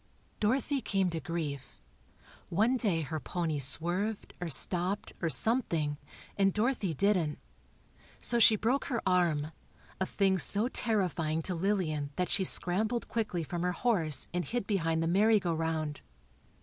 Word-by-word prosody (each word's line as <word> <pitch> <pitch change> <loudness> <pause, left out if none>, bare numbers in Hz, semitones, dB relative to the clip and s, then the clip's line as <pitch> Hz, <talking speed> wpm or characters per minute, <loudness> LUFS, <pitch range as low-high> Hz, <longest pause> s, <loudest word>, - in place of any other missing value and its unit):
Dorothy 265 +5 0
came 195 -5 0
to 165 - -3
grief. 155 - -5 0.7
One 220 +9 +2
day 200 -10 0
her 155 +1 -4
pony 160 -2 -2
swerved, 175 +10 -1
or 175 - -3
stopped, 180 +6 +1
or 170 - 0
something, 160 - 0 0.4
and 195 -1 +3
Dorothy 215 - 0
didn't. 180 -5 +1 0.8
So 235 - 0
she 225 -1 +7
broke 240 +7 0
her 240 -5 -2
arm, 170 -5 +1 0.5
a 190 - 0
thing 195 -2 +1
so 205 +6 +4
terrifying 175 - -1
to 185 - -1
Lillian 165 -6 -1
that 180 -1 -1
she 195 - +2
scrambled 215 +6 +2
quickly 215 -7 -2
from 170 +3 -4
her 180 0 0
horse 175 - +1
and 180 0 -1
hid 240 0 -3
behind 165 -6 0
the - - 0
merry 210 +5 +4
go 175 -3 -1
round. 160 -2 -2
180 Hz, 150 wpm, -30 LUFS, 165-210 Hz, 0.8 s, she